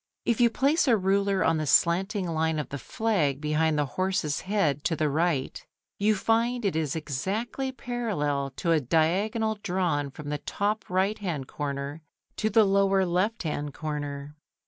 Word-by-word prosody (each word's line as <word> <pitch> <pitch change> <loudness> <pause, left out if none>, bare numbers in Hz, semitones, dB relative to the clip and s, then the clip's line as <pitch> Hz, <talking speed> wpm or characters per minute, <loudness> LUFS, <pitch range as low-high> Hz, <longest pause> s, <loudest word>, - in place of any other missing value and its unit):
If 235 0 +1
you 240 - +6
place 280 +6 +2
a 235 -3 +5
ruler 195 0 +1
on 165 - +2
the 155 -1 -2
slanting 185 - +2
line 160 -1 0
of 150 - -3
the 140 - -5
flag 160 - 0
behind 155 +1 +1
the 145 - +2
horse's 185 -2 -1
head 175 -8 0
to 165 - +1
the 155 -1 +1
right, 155 -2 0 0.4
you 210 +1 +3
find 230 +3 +1
it 195 - +1
is 155 -3 -1
exactly 195 - -3
parallel 200 - -2
to 170 - -1
a 160 - +4
diagonal 205 - +1
drawn 175 -7 0
from 145 +2 -8
the 150 0 -2
top 210 +2 -2
right 190 +4 +1
hand 165 -10 -3
corner 140 +1 -4 0.4
to 215 - +1
the 225 0 +5
lower 195 -1 +3
left 185 +6 0
hand 150 -3 -3
corner. 145 -2 -5
175 Hz, 170 wpm, -27 LUFS, 150-210 Hz, 0.4 s, you